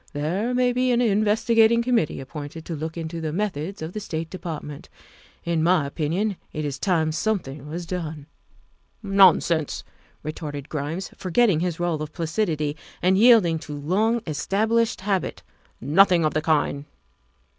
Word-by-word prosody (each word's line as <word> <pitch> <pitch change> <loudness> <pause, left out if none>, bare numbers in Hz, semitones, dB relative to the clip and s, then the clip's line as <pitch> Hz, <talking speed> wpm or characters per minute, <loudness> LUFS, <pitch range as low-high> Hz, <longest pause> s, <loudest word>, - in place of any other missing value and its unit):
There 175 +11 -1
may 250 0 +2
be 255 +1 +1
an 240 -1 +3
investigating 225 +1 +3
committee 235 -10 +1
appointed 145 +3 -8
to 170 - -4
look 160 +2 -5
into 165 0 -5
the 155 -1 -2
methods 185 -1 -3
of 160 +3 -6
the 215 - -3
State 160 -5 -5
Department. 155 -5 -7 0.5
In 170 -1 0
my 170 -2 +3
opinion 170 +8 -1
it 155 0 -4
is 140 -1 -4
time 160 -4 +1
something 155 -7 -2
was 170 +3 -5
done. 160 -4 -5 0.2
' - - -33
' - - -37
' - - -41
' - - -40 0.2
Nonsense! 170 -5 +4 0.2
' - - -32
' - - -38
retorted 150 -2 -6
Grimes, 155 +5 -4
forgetting 190 -1 +2
his 175 -1 -2
role 175 -3 -1
of 155 0 -6
placidity 160 -3 -1 0.3
and 185 +1 +4
yielding 205 -7 +5
to 150 -1 -7
long 210 +11 0
established 220 +8 0
habit, 195 -1 -2 0.3
" - - -38
nothing 170 +4 +4
of 155 - +1
the 155 - 0
kind." 150 -2 0
170 Hz, 170 wpm, -24 LUFS, 155-205 Hz, 0.5 s, yielding